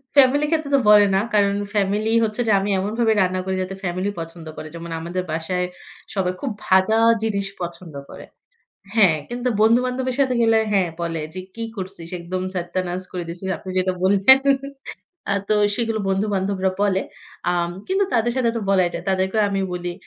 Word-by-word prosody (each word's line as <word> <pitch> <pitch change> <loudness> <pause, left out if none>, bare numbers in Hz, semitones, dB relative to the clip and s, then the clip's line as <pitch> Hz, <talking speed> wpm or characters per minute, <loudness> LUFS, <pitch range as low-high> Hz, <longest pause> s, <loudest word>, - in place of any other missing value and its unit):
Family 280 +2 +5
ক্ষেত্রে 310 -3 0
তো - - +5
বলে 210 -1 +8
না। - - +4
কারণ 200 -1 +3 0.2
ফ্যামিলি 205 +2 +1
হচ্ছে 220 +2 -1
যে - - +3
আমি 200 +1 -2
এমনভাবে 220 +3 +1
রান্না 185 0 +1
করি 190 0 -1
যাতে 190 +1 -4
ফ্যামিলি 185 +2 -1
পছন্দ 165 0 -8
করে। 155 - -6
যেমন 170 0 -7
আমাদের 175 +2 -3
বাসায় 180 +3 -1 0.5
সবাই 185 -1 0
খুব 275 -5 -2 0.2
ভাজা 190 +4 +4 0.3
জিনিস 200 -3 -1
পছন্দ 170 -2 -6 0.2
করে - - -10 0.7
হ্যাঁ। 185 -8 +5
কিন্তু 245 +1 -2
বন্ধু-বান্ধবের 250 +3 +2
সাথে 260 -2 +2
গেলে 225 -1 +4
হ্যাঁ, 190 -4 +2
বলে 165 -2 -2
যে 185 - -5
"কি 230 - -4
করছিস 185 -3 -7
একদম 185 +2 -4
সাত্তিয়া 180 +1 -2
নাস 180 +1 -3
করে 180 -1 -4
দিয়েছিস।" 175 +3 -5
আপনি 190 - -10
যেটা 185 0 0
বললেন। 200 +8 +6 0.9
আ - - +3 0.2
তো 215 - +4 0.2
সেগুলো 225 -2 -1
বন্ধু-বান্ধবরা 195 -1 0
বলে। 195 -2 +2 0.5
আম 175 -1 0 0.2
কিন্তু 385 +2 +2
তাদের 240 0 +2
সাথে 240 -2 +2
তো - - -3
বলাই 185 -3 +3
যায়। 170 - -5
তাদেরকেও 190 +3 +1
আমি 195 -1 -1
বলি। 175 0 -4
195 Hz, 175 wpm, -22 LUFS, 180-220 Hz, 0.9 s, বলে